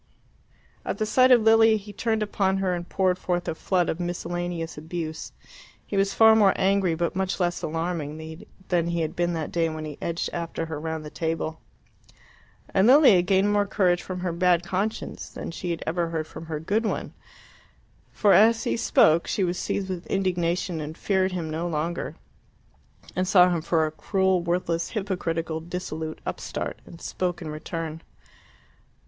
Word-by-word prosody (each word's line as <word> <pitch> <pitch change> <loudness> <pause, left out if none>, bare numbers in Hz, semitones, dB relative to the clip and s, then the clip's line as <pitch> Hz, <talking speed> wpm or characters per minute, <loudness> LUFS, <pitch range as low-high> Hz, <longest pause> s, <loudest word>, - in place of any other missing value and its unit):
At - - -3
the 215 - 0
sight 255 +4 +4
of 245 -3 +6
Lilia 225 0 +6
he 205 0 -10
turned 220 +1 0
upon 195 -2 0
her 190 -2 0
and 175 0 -5
poured 185 -1 +1
forth 175 -1 -2
a - - 0
flood 180 +2 0
of 160 - -2
miscellaneous 175 -1 -3
abuse. 160 0 -5 0.5
He - - -5
was 195 0 +2
far 220 0 +7
more 205 -3 +5
angry 190 -3 +2
but 170 +2 -1
much 190 0 -1
less 175 -1 0
alarming 160 -1 -4 0.3
than 170 -2 +2
he 170 0 -1
had 160 -1 -3
been 175 0 0
that 160 -2 -3
day 165 -1 +1
when 155 0 -5
he 150 -2 -8
edged 170 0 -2
after 165 -1 -3
her 160 -2 -5
round 160 0 -4
the 150 - -8
table. 160 -1 -3 1.1
And 195 +2 +4
Lilia 260 - +7
gained 195 +3 +2
more 205 -1 +2
courage 180 -3 +2
from 180 -1 -6
her 180 -1 -1
bad 175 0 +3
conscience 190 +5 -3
than - - -7
she 170 0 -3
ever 170 +1 -1
had 160 -1 -2
from 165 +1 -10
her 155 -2 -3
good 205 +8 0
one, 220 - -3 1.0
for 205 -3 +3
as 225 +2 +5
he - - 0
spoke 165 -6 +4
she 195 - 0
was 180 0 -1
seized 195 - -2
with 185 -2 -5
indignation 180 -3 -1
and 155 +2 -6
feared 190 -1 +1
him 170 -3 -3
no 165 +2 -2
longer, 165 +1 -3 1.0
and 185 0 0
saw 180 -1 +6
him 170 -2 0
for 160 -1 +1
a 155 - -3
cruel, 190 +2 +1
worthless, 170 -1 -1
hypocritical, 170 -6 -2
dissolute 160 -2 -5
upstart, - - -4
and 165 - -12
spoke 180 -1 -2
in 160 - -6
return. 160 +1 -5
175 Hz, 175 wpm, -25 LUFS, 165-190 Hz, 1.1 s, far